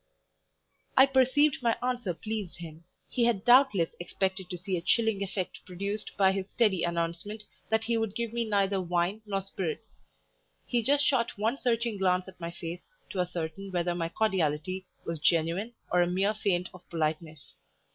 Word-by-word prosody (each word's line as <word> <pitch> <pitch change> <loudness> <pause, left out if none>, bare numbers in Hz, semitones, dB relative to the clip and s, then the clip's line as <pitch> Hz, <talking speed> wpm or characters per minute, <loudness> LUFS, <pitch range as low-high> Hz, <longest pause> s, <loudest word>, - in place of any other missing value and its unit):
I 265 - +10
perceived 275 +2 +3
my 235 -2 +2
answer 245 -7 -1
pleased 215 -2 -4
him; 165 -1 -10 0.2
he 240 - +1
had 225 -5 +1
doubtless 245 -9 +5
expected 190 +1 -2
to 180 - -4
see 185 +2 -2
a 170 - -2
chilling 225 +1 +2
effect 190 -1 -4
produced 200 +4 -4
by 190 -1 +5
his 195 0 -3
steady 210 -7 +2
announcement 170 +5 -2 0.3
that 220 0 +2
he 230 0 +1
would 225 -3 -2
give 235 -1 -2
me 235 0 0
neither 200 -3 +1
wine 180 +4 0
nor 195 -1 -1
spirits; 195 +2 -5 0.6
he 240 -2 +1
just 285 +5 +3
shot 240 -6 +1
one 220 +5 +1
searching 235 -4 0
glance 185 -1 +2
at 190 - -12
my 170 -1 -4
face 170 - -7 0.2
to 190 - -4
ascertain 180 +2 -3
whether 175 -1 0
my 165 -1 -2
cordiality 185 -2 0 0.2
was 165 -1 -3
genuine 170 +9 +1 0.2
or 180 - +4
a 175 - +3
mere 190 +4 +1
feint 185 -4 0
of 180 - -12
politeness. 155 -2 -3
195 Hz, 170 wpm, -29 LUFS, 175-225 Hz, 0.6 s, I